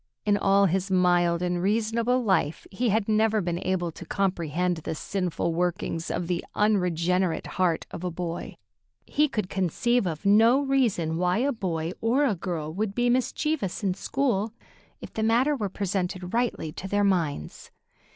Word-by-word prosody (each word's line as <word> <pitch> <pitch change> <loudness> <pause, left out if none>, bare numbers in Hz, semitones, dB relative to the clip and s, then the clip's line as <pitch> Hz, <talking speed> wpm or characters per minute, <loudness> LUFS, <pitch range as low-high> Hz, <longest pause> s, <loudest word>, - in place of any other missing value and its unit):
In 205 - +3
all 200 0 +4
his 190 +2 0
mild 175 -2 +3
and 180 -1 -1
reasonable 230 +5 +1
life, 170 -7 +1
he 235 +5 0
had 215 0 +1
never 220 0 +3
been 175 -2 -2
able 175 -2 -1
to - - -10
comprehend 180 -2 -1
the 160 0 -4
sinful 180 -1 -2
workings 170 -1 -2
of 175 - -2
the 175 0 -2
unregenerate 180 -4 +1
heart 180 -3 0
of 170 - -7
a 180 - -1
boy. 170 0 -5 0.5
He 300 +1 +2
could 215 -8 -2
conceive 195 +5 0
of 160 +2 -5
no 225 +6 +6
reason 235 - +1
why 180 +2 +1
a 270 +5 +1
boy 170 - -2
or 250 +6 +2
a 245 - +2
girl 165 -4 -4
would 200 +2 -2
be 240 0 +2
mischievous 255 - -1
in 190 -2 +1
school, 225 0 -1 0.5
if - - -9
the 220 - -2
matter 240 +7 +3
were 210 -7 -2
presented 185 -1 -3
rightly 235 -9 -1
to 180 +4 -7
their 205 +1 +1
minds. 165 - -1
190 Hz, 165 wpm, -26 LUFS, 175-220 Hz, 0.5 s, no